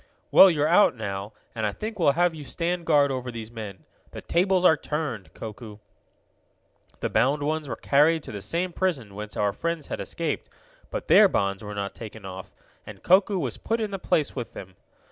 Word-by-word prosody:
"Well, 190 - +9
you're 150 -3 +1
out, 175 -2 +5
now, 100 -2 -5 0.2
and 110 - -4
I - - -1
think 215 - -6
we'll 145 -5 +4
have 175 +1 +2
you 155 -2 -8
stand 170 +4 -3
guard 145 -3 +4
over 130 -1 -3
these 115 -2 -7
men. 105 -5 -8 0.3
The - - -7
tables 185 +1 +1
are 160 - +7
turned, 150 -10 -4
Koku." 110 -1 -8 1.2
The - - -1
bound 135 +6 +2
ones 155 -1 -2
were - - -3
carried 150 +3 +3
to - - -8
the 100 -2 -6
same 170 - -2
prison 140 - -1
whence 105 +1 -7
our 100 -1 +1
friends 165 -3 -3
had - - -4
escaped, - - -3 0.4
but - - -5
their - - +8
bonds 100 +1 -1
were 105 0 -6
not 100 -1 -3
taken 110 -2 -10
off, 95 -1 -8 0.3
and - - -12
Koku 190 +2 +4
was 175 - -3
put 230 +1 -2
in 215 -2 -2
the 195 - -4
place 150 -4 0
with 125 -3 -5
them. 95 -1 -10
140 Hz, 200 wpm, -25 LUFS, 105-170 Hz, 1.2 s, Well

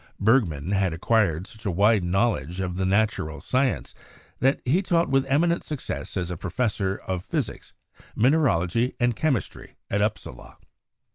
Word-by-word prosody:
Bergman 100 - +2
had 95 -4 +1
acquired 90 -2 +1
such 110 +1 -13
a 100 - -1
wide 100 +3 +3
knowledge 90 - 0
of 90 -2 -2
the 95 0 0
natural 100 -7 0
sciences 120 - -1 0.5
that 135 +3 +2
he 155 +10 +3
taught 170 -3 +1
with 135 0 +3
eminent 170 +5 +2
success 150 -7 -5
as 90 -1 -2
professor 100 0 -1
of 90 -1 -3
physics, - - -4 0.4
min 125 +6 +4
eralogy 115 - +1
and 120 -2 +2
chemistry 140 -6 -2 0.2
at 100 - +1
Upsala. 105 +1 -4
105 Hz, 145 wpm, -25 LUFS, 90-125 Hz, 0.5 s, min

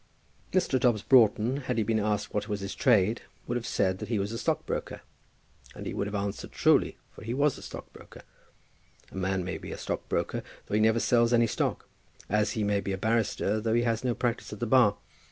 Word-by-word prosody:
Mr. 175 -8 +2
Dobbs 120 -5 +2
Broughton, 120 0 +4
had 130 -4 -3
he 110 - +2
been 110 +1 +1
asked 105 0 -1
what 105 +1 -2
was 105 -1 -2
his 100 0 -4
trade, 110 -3 +3 0.2
would 120 - -2
have 120 -1 -3
said 95 -1 0
that - - -6
he 115 - +1
was 100 +1 -2
a 115 - -4
stockbroker; - - -2 0.7
and - - -8
he - - -4
would 100 - -2
have 105 - -5
answered 100 0 -3
truly, - - +3
for - - -13
he 115 +2 -3
was 145 0 +2
a - - -11
stockbroker. - - -11 0.9
A - - -12
man 95 0 -1
may 90 -3 -4
be - - -8
a - - -5
stockbroker - - -2 0.2
though - - -8
he 105 - +3
never 110 +1 +4
sells 120 0 +3
any 120 0 +5
stock; 110 - -2 0.4
as 105 +1 +1
he 110 - -1
may 100 -1 +1
be 100 - -3
a - - -2
barrister 110 0 0
though 110 +1 +1
he 120 - +3
has 115 -1 0
no 125 -2 0
practice 120 -1 -2
at 105 - -7
the 120 - -1
bar. 110 -4 +4
110 Hz, 220 wpm, -28 LUFS, 100-120 Hz, 0.9 s, any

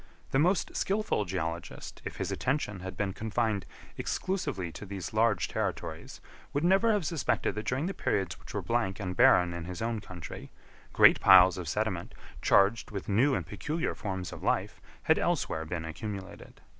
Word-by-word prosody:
The 135 - +3
most 180 +5 +2
skilful 200 - 0
geologist, 85 -2 -5
if - - -5
his - - -3
attention 125 -7 -1
had 95 0 -7
been 100 -2 -1
confined 110 -1 -1 0.3
exclusively 145 - -2
to - - -9
these 100 -2 -6
large 110 -4 +2
territories, - - -4 0.3
would 145 +2 0
never 195 +6 +4
have 205 -6 +1
suspected 155 - 0
that 105 +2 -5
during 130 +5 0
the 195 - -2
periods 95 - -1
which - - -11
were - - -2
blank 95 +1 0
and 90 -3 -3
barren 90 0 +5
in 85 -1 -5
his 90 0 -6
own 115 0 -1
country, 90 -4 -9 0.4
great - - +7
piles 95 -1 +7
of 90 - -5
sediment, - - -2 0.3
charged 105 +4 +3
with 100 -2 -6
new 125 +8 +3
and - - -2
peculiar 160 +2 -3
forms 95 -5 -4
of - - -9
life, - - -1 0.2
had - - +3
elsewhere 80 0 0
been 80 0 -4
accumulated. 95 +4 -7
100 Hz, 170 wpm, -30 LUFS, 90-135 Hz, 0.4 s, great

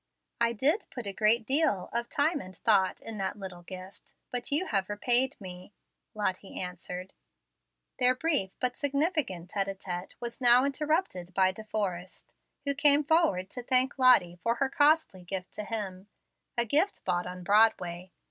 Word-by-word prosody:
"I 235 0 +2
did 285 - +1
put 245 -3 -7
a 200 - -4
great 220 +3 +2
deal 270 - +1
of 235 0 -2
time 290 +1 +1
and 185 0 -11
thought 195 -4 +2
in 220 -2 -6
that 195 +1 -2
little 185 -3 -8
gift, 185 +2 -11 0.2
but 245 +2 -4
you 305 +6 +2
have 195 - -1
repaid 245 +6 0
me," 185 0 -10 0.4
Lottie 195 -2 -3
answered. 180 +1 -6 0.9
Their 250 0 +5
brief 285 -9 +1
but 250 -1 -1
significant 280 - -1
tete 200 -2 -1
a 195 - -4
tete 180 -1 -6
was 240 +2 -7
now 245 +1 +6
interrupted 280 - -2
by 190 -1 +4
De 215 +3 -10
Forrest, 185 -4 -4 0.3
who 280 - +1
came 285 +1 +6
forward 305 - +2
to 250 - -5
thank 255 +2 +1
Lottie 195 -9 +5
for 230 +3 +1
her 265 +3 0
costly 290 - +3
gift 185 +1 -6
to 210 - -5
him, 200 -3 -4 0.5
a 235 - +2
gift 310 - 0
bought 175 -1 0
on 180 0 -7
Broadway. 185 -3 +2
215 Hz, 165 wpm, -29 LUFS, 185-265 Hz, 0.9 s, now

